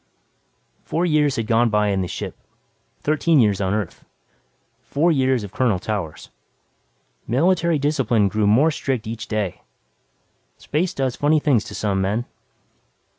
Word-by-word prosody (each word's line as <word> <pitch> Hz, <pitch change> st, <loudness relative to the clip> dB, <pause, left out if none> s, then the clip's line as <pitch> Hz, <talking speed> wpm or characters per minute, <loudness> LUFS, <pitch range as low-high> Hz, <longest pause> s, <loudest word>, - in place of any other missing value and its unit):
Four 170 Hz, +2 st, -1 dB
years 150 Hz, -4 st, +2 dB
had 115 Hz, -, -2 dB
gone 115 Hz, +1 st, +3 dB
by 105 Hz, -1 st, +2 dB
in 95 Hz, -1 st, 0 dB
the 90 Hz, -, -2 dB
ship; -, -, -6 dB, 0.7 s
thirteen 155 Hz, +1 st, +2 dB
years 105 Hz, -4 st, +2 dB
on 95 Hz, +1 st, 0 dB
Earth. 105 Hz, -5 st, -4 dB, 0.8 s
Four 165 Hz, +5 st, +1 dB
years 130 Hz, -5 st, +1 dB
of 100 Hz, -, -8 dB
Colonel 120 Hz, -7 st, +1 dB
Towers. 90 Hz, -5 st, -5 dB, 1.0 s
Military 170 Hz, +5 st, +2 dB
discipline 135 Hz, -8 st, +1 dB
grew 105 Hz, +1 st, 0 dB
more 135 Hz, +10 st, +4 dB
strict 130 Hz, -6 st, -2 dB
each 115 Hz, +1 st, -6 dB
day. 105 Hz, -5 st, -3 dB, 1.0 s
Space 165 Hz, +5 st, -2 dB
does 130 Hz, -2 st, -1 dB
funny 150 Hz, +2 st, +2 dB
things 135 Hz, -8 st, +2 dB
to -, -, -8 dB
some 100 Hz, -2 st, -1 dB
men. 105 Hz, +5 st, -1 dB
120 Hz, 140 wpm, -22 LUFS, 105-150 Hz, 1.0 s, more